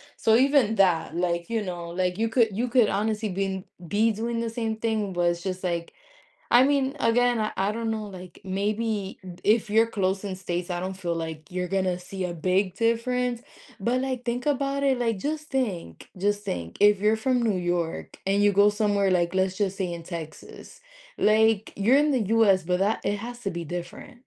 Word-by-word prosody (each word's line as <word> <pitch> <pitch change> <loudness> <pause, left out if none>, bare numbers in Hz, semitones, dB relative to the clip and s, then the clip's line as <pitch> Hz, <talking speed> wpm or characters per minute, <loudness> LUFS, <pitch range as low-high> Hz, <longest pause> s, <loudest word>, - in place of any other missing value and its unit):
So, 220 - +3
even 265 -4 +3
that, 170 -5 +2
like, 170 -1 -1
you 230 -1 0
know, 175 -3 -5
like, 180 +1 -1
you 225 0 0
could 225 -1 +3
you 245 +1 0
could 240 -3 +4
honestly 215 +1 -1
been 190 0 -3 0.2
be 210 +6 +2
doing 230 +2 -2
the 230 - -2
same 225 -1 -3
thing, 220 -3 -1
but 175 -1 +1
it's 170 0 -6
just, 185 -1 -3
like 170 -2 -2 0.6
I 240 - +7
mean, 275 0 +1
again, 245 0 +3
I 215 0 -1
I 195 +2 +1
don't 225 +1 -3
know, 220 -1 -2
like, 185 -3 -11
maybe 205 +1 -2 0.3
if 215 +1 +3
you're 225 +2 +4
close 195 -3 -1
in 195 -2 -4
states, 180 -1 -4
I 175 0 -2
don't 185 +1 -3
feel 175 -3 -3
like 160 -2 -6
you're 180 0 -2
gonna 185 -2 0
see 185 +1 -5
a 175 - -4
big 185 +3 0
difference, 235 +2 0 0.4
but, 245 +6 0
like, 260 -2 -3
think 245 +2 -2
about 280 -1 0
it, 265 -2 +2
like, 230 -4 0
just 305 +6 -4
think. 195 - -3
Just 205 +2 0
think 85 - -5
if 205 -1 +5
you're 210 +2 +3
from 250 +2 +1
New 215 -5 +1
York 175 -2 -3
and 200 +1 +2
you 205 - +5
go 200 +1 +6
somewhere 205 -2 +1
like, 175 -1 +1
let's 190 0 0
just 195 -2 -1
say 185 -3 -2
in 170 -1 -6
Texas. 165 - -9 0.4
Like, 220 0 +3
you're 230 +7 +4
in 295 +1 +3
the 260 - +2 0.2
US, 200 -4 +5
but 180 +1 0
that 205 +3 +1
it 205 - 0
has 240 +3 -7
to 205 - -3
be 170 -1 -5
different. 175 - -7
205 Hz, 205 wpm, -26 LUFS, 180-230 Hz, 0.6 s, I